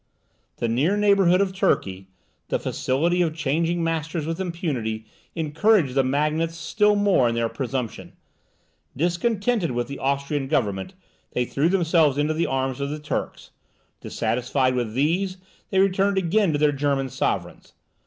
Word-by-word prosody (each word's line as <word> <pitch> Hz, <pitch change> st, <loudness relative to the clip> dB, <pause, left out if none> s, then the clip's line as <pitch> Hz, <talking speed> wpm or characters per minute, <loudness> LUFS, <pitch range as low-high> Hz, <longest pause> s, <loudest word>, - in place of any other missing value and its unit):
The 120 Hz, -, -1 dB
near 140 Hz, -, +1 dB
neighbourhood 200 Hz, -3 st, +4 dB
of 190 Hz, -1 st, 0 dB
Turkey, 95 Hz, -, 0 dB, 0.4 s
the -, -, 0 dB
facility 170 Hz, +7 st, 0 dB
of 160 Hz, -3 st, 0 dB
changing 165 Hz, +3 st, 0 dB
masters 160 Hz, -1 st, -2 dB
with 165 Hz, +2 st, -3 dB
impunity, 145 Hz, -, -3 dB, 0.3 s
encouraged 160 Hz, -, +2 dB
the 135 Hz, 0 st, +3 dB
magnates 155 Hz, +5 st, 0 dB
still 210 Hz, +4 st, +2 dB
more 200 Hz, -12 st, +3 dB
in 115 Hz, -, -2 dB
their 115 Hz, 0 st, +1 dB
presumption; 130 Hz, -3 st, -4 dB, 0.8 s
discontented 200 Hz, -, 0 dB
with 120 Hz, 0 st, -2 dB
the 140 Hz, -, -7 dB
Austrian 140 Hz, +1 st, -1 dB
government 110 Hz, -, -1 dB, 0.4 s
they 125 Hz, -, 0 dB
threw 145 Hz, +7 st, 0 dB
themselves 165 Hz, -6 st, +3 dB
into 150 Hz, +2 st, +1 dB
the 165 Hz, +2 st, 0 dB
arms 135 Hz, 0 st, -2 dB
of 140 Hz, -, -2 dB
the 150 Hz, -, -4 dB
Turks; 150 Hz, -1 st, -5 dB, 0.5 s
dissatisfied 130 Hz, +2 st, 0 dB
with 120 Hz, -3 st, -2 dB
these, 180 Hz, +7 st, 0 dB, 0.3 s
they 190 Hz, -, -1 dB
returned 195 Hz, +1 st, +2 dB
again 190 Hz, +1 st, +2 dB
to 145 Hz, -, 0 dB
their 150 Hz, 0 st, +3 dB
German 140 Hz, -1 st, 0 dB
sovereigns. -, -, -3 dB
155 Hz, 145 wpm, -24 LUFS, 135-180 Hz, 0.8 s, neighbourhood